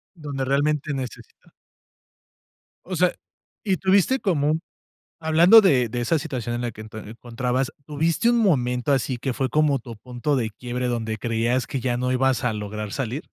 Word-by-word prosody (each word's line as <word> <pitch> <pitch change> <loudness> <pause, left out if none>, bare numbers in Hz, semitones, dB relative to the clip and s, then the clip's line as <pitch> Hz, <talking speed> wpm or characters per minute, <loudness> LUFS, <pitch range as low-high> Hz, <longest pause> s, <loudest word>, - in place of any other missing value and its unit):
Donde 145 -5 -4
realmente 145 +2 0
necesita 130 -3 -8 1.3
O 185 0 -4
sea, 180 +1 +3 0.5
y 195 -3 +1
tuviste 195 +8 +3
como 150 -8 +1
un 160 - -1 0.6
hablando, 165 +7 +7
de 135 - +3
de 120 +2 -3
esa 120 +7 +1
situación 130 -7 -4
en 120 - -3
la 120 - -2
que 110 - -10
te 110 0 -9
ento 105 - -9
encontrabas, 125 +3 -2
¿tuviste 160 +8 +1
un 240 - +3
momento, 130 - +1
así 130 -2 0
que 130 +2 -2
fue, 130 +2 -1
como 150 0 +2
tu 120 -2 -10
punto 125 +6 -3
de 115 -4 -1
quiebre, 125 +3 -4
donde 115 -2 -2
creías 115 +3 0
que 135 - -3
ya 125 -1 -1
no 125 +1 -1
ibas 130 -1 +1
a 120 - +1
lograr 105 0 -5
salir? 135 +3 -3
130 Hz, 180 wpm, -23 LUFS, 120-155 Hz, 1.3 s, hablando